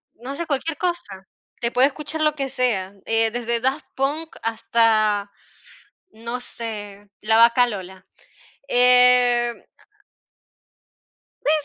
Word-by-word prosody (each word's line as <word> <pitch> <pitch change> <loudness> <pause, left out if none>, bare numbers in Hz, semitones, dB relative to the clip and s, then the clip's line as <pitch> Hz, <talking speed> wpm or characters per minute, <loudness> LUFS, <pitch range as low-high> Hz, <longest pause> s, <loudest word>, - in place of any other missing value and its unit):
No 255 +5 -8
sé, 340 +3 -4
cualquier 300 +1 -2
cosa, 245 - -4 0.3
te 235 0 -1
puede 255 +2 +4
escuchar 300 +2 -5
lo 305 -1 +1
que 275 -2 -4
sea, 235 -8 -2
eh, 225 0 +1
desde 235 0 -2
daft 265 +5 -2
punk 295 +4 -3
hasta, 215 -2 +1 0.8
no 235 +3 -6
sé, 205 -4 -8
la 220 +1 +2
vaca 235 +2 +5
Lola, 190 -4 -8 0.6
eh 245 -1 +5 1.9
Sí, 300 - +3
240 Hz, 115 wpm, -21 LUFS, 220-270 Hz, 1.9 s, vaca